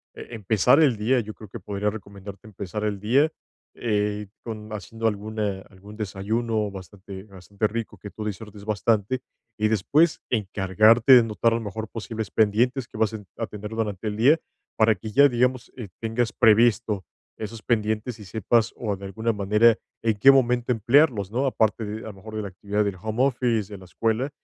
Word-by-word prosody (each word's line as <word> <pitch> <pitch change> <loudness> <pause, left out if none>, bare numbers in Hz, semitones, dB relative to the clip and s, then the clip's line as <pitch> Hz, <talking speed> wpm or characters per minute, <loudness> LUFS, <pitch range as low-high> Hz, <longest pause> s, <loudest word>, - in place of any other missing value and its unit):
Eh, - - -9
empezar 110 - +3
el 135 -8 +3
día, 120 +5 +2
yo 110 -2 -5
creo 110 - -12
que 115 - -8
podría 100 +2 -2
recomendarte 100 -1 -10
empezar 105 0 -6
el 105 -2 -2
día, 135 +10 +2 0.5
eh, 105 -2 -1
con, 110 -2 -8
haciendo 115 +2 -6
alguna 105 -1 -2
algún 100 +2 -14
desayuno 110 +1 -2
bastante 95 0 -10
bastante 100 +1 -3
rico, 110 -1 -5
que 105 +3 -9
tú 110 - -8
disfrutes 105 0 -7
bastante. 110 +3 0 0.4
Y 110 - +2
después 140 - +2
encargarte 110 +3 +4
de 125 -2 +8
notar 115 +1 +1
a - - +1
lo - - -5
mejor 110 +1 -5
posibles 110 -1 -6
pendientes 120 +4 +2
que - - -11
vas 110 -1 +1
a 110 -2 -7
a 115 - -3
tener 105 0 -8
durante 110 -2 -3
el 105 - -2
día, 140 +9 +5 0.4
para 110 0 +4
que 105 +3 -8
ya, 140 +6 +6
digamos, 125 0 0 0.3
tengas 115 +1 -1
previsto 110 -2 +3 0.3
esos 110 +1 -7
pendientes, 110 +1 -1
y - - -9
sepas, 110 +3 +1
o 105 -4 -2
de 100 - -13
alguna 110 +4 -2
manera, 105 +3 +4 0.2
en 110 -2 +1
qué 135 +7 +7
momento 125 -2 +2
emplearlos, 120 -2 +3
¿no? 130 +5 0
Aparte 110 -4 +1
de, 105 +1 -5
a 110 - -8
lo - - -15
mejor, 110 +3 -11
de - - -2
la - - -4
actividad 100 +3 -2
del 100 -2 -2
home 110 +4 -1
office, 120 -6 0
de - - -7
la 95 - -14
escuela, 115 - -1
110 Hz, 185 wpm, -24 LUFS, 105-115 Hz, 0.5 s, de